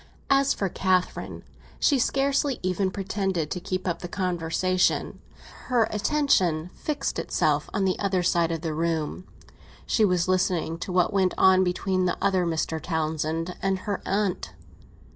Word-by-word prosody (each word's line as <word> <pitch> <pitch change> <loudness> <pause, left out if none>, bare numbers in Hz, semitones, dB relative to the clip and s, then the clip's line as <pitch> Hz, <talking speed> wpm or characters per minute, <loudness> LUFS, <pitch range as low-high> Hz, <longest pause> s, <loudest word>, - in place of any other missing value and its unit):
As 275 0 +4
for 195 - -1
Catherine, 185 0 -1 0.4
she 280 -3 +3
scarcely 275 +1 +1
even 185 +1 0
pretended 190 -4 -2
to 180 - -2
keep 185 +1 -4
up 170 -1 -1
the 175 - -6
conversation; 180 0 0 0.4
her 235 -3 +2
attention 195 - +1
had - - -23
fixed 300 -2 -2
itself - - 0
on 200 -3 0
the 185 - 0
other 190 -3 0
side 170 -1 +2
of 165 -2 -3
the 160 -2 -3
room; 165 +2 -2 0.6
she 220 - +2
was 180 -3 +2
listening 180 -3 0
to 180 - -5
what 180 +2 +2
went 190 -2 +2
on 190 0 +5
between 185 +1 0
the 180 - 0
other 190 -3 +1
Mr. 160 -1 -2
Townsend 160 +1 -2
and 195 0 +1
her 205 -2 -2
aunt. 195 -1 -1
185 Hz, 155 wpm, -26 LUFS, 170-200 Hz, 0.6 s, on